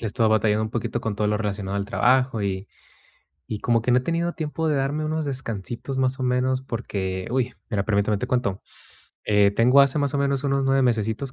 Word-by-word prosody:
he 115 Hz, -, -3 dB
estado 110 Hz, +1 st, +1 dB
batallando 110 Hz, 0 st, +2 dB
un 110 Hz, -, -5 dB
poquito 120 Hz, 0 st, -3 dB
con 110 Hz, -2 st, -2 dB
todo 105 Hz, +1 st, 0 dB
lo 105 Hz, 0 st, +1 dB
relacionado 100 Hz, -2 st, -3 dB
al 100 Hz, -, -1 dB
trabajo, 125 Hz, +2 st, +2 dB
y 95 Hz, 0 st, -2 dB, 0.8 s
y 105 Hz, -, -4 dB
como 115 Hz, 0 st, +1 dB
que 125 Hz, -, 0 dB
no 125 Hz, -, +5 dB
he -, -, +2 dB
tenido 170 Hz, +4 st, -1 dB
tiempo 160 Hz, +1 st, -3 dB
de 150 Hz, -, +1 dB
darme 140 Hz, +3 st, -1 dB
unos 155 Hz, 0 st, -2 dB
descansitos, 125 Hz, -1 st, -4 dB
más 130 Hz, 0 st, 0 dB
o -, -, -2 dB
menos, 130 Hz, +1 st, +1 dB
porque, 95 Hz, -7 st, -4 dB
uy. 125 Hz, 0 st, 0 dB, 0.2 s
Mira 100 Hz, -3 st, 0 dB
permítame, 105 Hz, 0 st, +1 dB
te 115 Hz, -, -3 dB
cuento, 125 Hz, -7 st, -1 dB, 0.6 s
eh, 105 Hz, -1 st, +4 dB
tengo 125 Hz, +6 st, +5 dB
hace 140 Hz, +1 st, +3 dB
más 140 Hz, -1 st, 0 dB
o -, -, +1 dB
menos 140 Hz, 0 st, 0 dB
unos 140 Hz, 0 st, +1 dB
9 135 Hz, 0 st, +2 dB
mesesitos 115 Hz, +2 st, 0 dB
120 Hz, 215 wpm, -24 LUFS, 105-135 Hz, 0.8 s, no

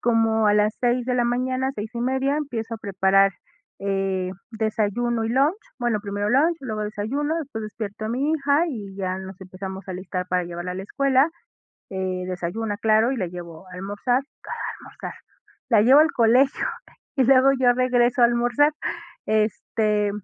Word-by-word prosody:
Como 225 Hz, -2 st, +2 dB
a 205 Hz, -, +4 dB
las 210 Hz, +1 st, +3 dB
6 245 Hz, 0 st, +1 dB
de 250 Hz, 0 st, 0 dB
la 240 Hz, -1 st, +2 dB
mañana, 255 Hz, +2 st, 0 dB
6:30, 255 Hz, +6 st, -1 dB
empiezo 235 Hz, -6 st, -3 dB
a -, -, -5 dB
preparar, 195 Hz, -1 st, +3 dB, 0.5 s
eh, 195 Hz, -2 st, -1 dB, 0.2 s
desayuno 225 Hz, +1 st, 0 dB
y 225 Hz, -, -1 dB
lunch. 280 Hz, +9 st, +3 dB, 0.2 s
Bueno, 240 Hz, -3 st, +1 dB
primero 205 Hz, 0 st, -2 dB
lunch, 315 Hz, +6 st, +3 dB
luego 215 Hz, -5 st, -4 dB
desayuno. 255 Hz, +10 st, -2 dB
Después, 275 Hz, -8 st, -5 dB
despierto 215 Hz, 0 st, -6 dB
a -, -, -2 dB
mi 270 Hz, +6 st, 0 dB
hija, 295 Hz, +2 st, +2 dB
y 205 Hz, -8 st, -6 dB
ya 185 Hz, -1 st, -2 dB
nos 190 Hz, 0 st, -9 dB
empezamos 190 Hz, +1 st, -8 dB
a -, -, -3 dB
alistar, 180 Hz, 0 st, -4 dB
para 180 Hz, 0 st, +1 dB
llevarla 175 Hz, +1 st, -5 dB
a -, -, -6 dB
la 190 Hz, -, -5 dB
escuela. 275 Hz, +5 st, +2 dB, 0.6 s
Eh, 185 Hz, -1 st, -2 dB
desayuna, 195 Hz, +4 st, -3 dB
claro, 220 Hz, +3 st, +3 dB
y -, -, -2 dB
la 185 Hz, -, -1 dB
llevo 170 Hz, 0 st, -9 dB
a 180 Hz, -, -12 dB
almorzar 205 Hz, +7 st, -1 dB, 0.2 s
¿Cuál -, -, -6 dB
a -, -, -5 dB
almorzar?, -, -, -8 dB, 0.6 s
la 220 Hz, -4 st, +5 dB
llevo 265 Hz, +5 st, +7 dB
al 320 Hz, +2 st, +4 dB
colegio. 250 Hz, +4 st, +3 dB, 0.5 s
Y 260 Hz, -, +4 dB
luego, 265 Hz, +1 st, +6 dB
yo 245 Hz, -1 st, +5 dB
regreso 245 Hz, -1 st, +2 dB
a -, -, +9 dB
almorzar. 240 Hz, +5 st, +3 dB, 0.5 s
Este, 215 Hz, -1 st, +1 dB
225 Hz, 170 wpm, -24 LUFS, 195-255 Hz, 0.6 s, a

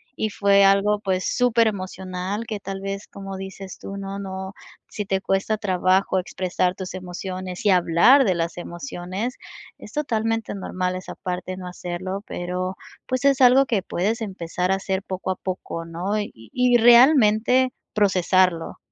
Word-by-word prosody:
y 215 Hz, -, -1 dB
fue 200 Hz, -1 st, +4 dB
algo, 200 Hz, +1 st, +4 dB
pues, 190 Hz, -2 st, -1 dB
superemocional 200 Hz, -4 st, 0 dB
que 215 Hz, -2 st, -4 dB
tal 195 Hz, 0 st, -6 dB
vez, 195 Hz, +1 st, -5 dB
como 195 Hz, -1 st, -8 dB
dices 190 Hz, 0 st, -8 dB
tú, 195 Hz, -, -7 dB
¿no? 195 Hz, 0 st, -5 dB
No 190 Hz, 0 st, -6 dB, 0.3 s
Si 210 Hz, -, -5 dB
te 190 Hz, 0 st, -1 dB
cuesta 195 Hz, +3 st, 0 dB
trabajo 190 Hz, -1 st, +2 dB
expresar 180 Hz, 0 st, -1 dB
tus 185 Hz, -1 st, -6 dB
emociones 185 Hz, +1 st, -6 dB
y 200 Hz, -, +5 dB
hablar 180 Hz, +10 st, +5 dB
de 190 Hz, -7 st, +1 dB
las 170 Hz, +1 st, -2 dB
emociones, 185 Hz, +5 st, -5 dB, 0.5 s
es -, -, -11 dB
totalmente 225 Hz, -7 st, -1 dB
normal 185 Hz, -2 st, -3 dB
esa 185 Hz, -, -7 dB
parte, 185 Hz, 0 st, -5 dB
no 185 Hz, -, -8 dB
hacerlo, 180 Hz, +2 st, -5 dB
pero, 180 Hz, +1 st, -4 dB, 0.3 s
pues, 255 Hz, +1 st, -1 dB
es 275 Hz, -1 st, +4 dB
algo 260 Hz, +2 st, +7 dB
que 220 Hz, -6 st, 0 dB
puedes 215 Hz, +7 st, -1 dB
empezar 180 Hz, -2 st, -2 dB
a -, -, +4 dB
hacer 190 Hz, 0 st, -2 dB
poco 190 Hz, -1 st, -4 dB
a -, -, -1 dB
poco, 180 Hz, -3 st, -5 dB
¿no? 180 Hz, +6 st, -2 dB
Y 205 Hz, -, -4 dB
y 240 Hz, -, +2 dB
realmente 240 Hz, 0 st, +6 dB, 0.2 s
procesarlo, 185 Hz, -4 st, +2 dB
195 Hz, 155 wpm, -23 LUFS, 185-215 Hz, 0.5 s, algo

